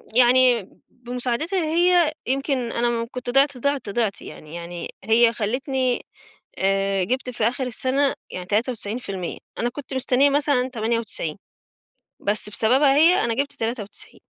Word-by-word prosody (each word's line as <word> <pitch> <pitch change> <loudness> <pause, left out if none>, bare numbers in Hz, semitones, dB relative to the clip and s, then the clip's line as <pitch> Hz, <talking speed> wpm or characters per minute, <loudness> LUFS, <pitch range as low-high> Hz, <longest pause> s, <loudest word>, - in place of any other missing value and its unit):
يعني، 245 -4 +4 0.2
بمساعدِتها 250 +8 -2
هي 345 0 +3 0.2
يمكن 265 -2 -1
أنا 240 0 +1
م 230 -1 -1
كُنت 250 -1 -5
ضِعت، 275 +1 +3
ضِعت، 280 -3 -1
ضِعت 215 -2 -1
يعني 155 +2 -10
يعني 170 0 -6
هي 230 +2 +4
خلّتني 255 +3 -1 0.5
آآ 195 0 +1
جِبت 255 +5 -2
في 225 -3 -3
آخر 250 +1 -2
السنة 265 +3 +1 0.2
يعني 180 0 -6
93% 210 -3 -2 0.2
أنا 240 - 0
كُنت 270 +1 -8
مستنية 260 +2 +3
مثلًا 280 -3 +2
98 220 -8 -1 0.8
بس 210 0 0
بسببها، 265 +6 +3
هي 335 +5 +5
أنا 230 - 0
جِبت 280 +4 -1
93 225 -3 -5
245 Hz, 135 wpm, -23 LUFS, 220-270 Hz, 0.8 s, هي